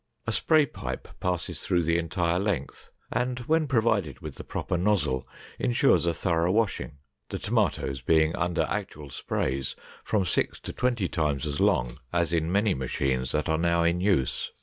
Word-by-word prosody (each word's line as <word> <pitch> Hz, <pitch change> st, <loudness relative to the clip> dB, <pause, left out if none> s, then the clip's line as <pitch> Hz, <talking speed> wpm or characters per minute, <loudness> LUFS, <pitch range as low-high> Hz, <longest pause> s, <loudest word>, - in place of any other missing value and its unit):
A -, -, -1 dB
spray 155 Hz, -2 st, +4 dB
pipe -, -, -6 dB
passed 90 Hz, -2 st, -2 dB
through 85 Hz, -1 st, +2 dB
the 85 Hz, +1 st, +2 dB
entire 85 Hz, +1 st, 0 dB
length 95 Hz, -9 st, -3 dB, 0.2 s
and, 125 Hz, +1 st, 0 dB
when 155 Hz, +5 st, +1 dB
provided 110 Hz, -, +1 dB
with -, -, -7 dB
the -, -, -9 dB
proper -, -, -3 dB
nozzle, 85 Hz, -9 st, +1 dB, 0.3 s
insures -, -, +3 dB
a 85 Hz, -, +2 dB
thorough 85 Hz, 0 st, +1 dB
washing, 105 Hz, -8 st, 0 dB, 0.3 s
the -, -, -3 dB
tomatoes 65 Hz, -1 st, 0 dB
being 80 Hz, +4 st, +3 dB
under 90 Hz, -1 st, 0 dB
actual 75 Hz, -2 st, -4 dB
sprays 65 Hz, +2 st, -2 dB, 0.3 s
from 105 Hz, -4 st, +1 dB
six 85 Hz, -, 0 dB
to -, -, -6 dB
twenty 120 Hz, -6 st, 0 dB
times 75 Hz, -5 st, -1 dB
as 75 Hz, -1 st, -3 dB
long -, -, +2 dB
as 85 Hz, -1 st, +1 dB
in 80 Hz, 0 st, +1 dB
many 100 Hz, +1 st, +3 dB
machines 65 Hz, 0 st, -1 dB
that 75 Hz, +1 st, 0 dB
are 80 Hz, 0 st, +1 dB
now 85 Hz, 0 st, +2 dB
in 85 Hz, +1 st, +2 dB
use. 90 Hz, -11 st, +1 dB
85 Hz, 170 wpm, -27 LUFS, 75-100 Hz, 0.3 s, spray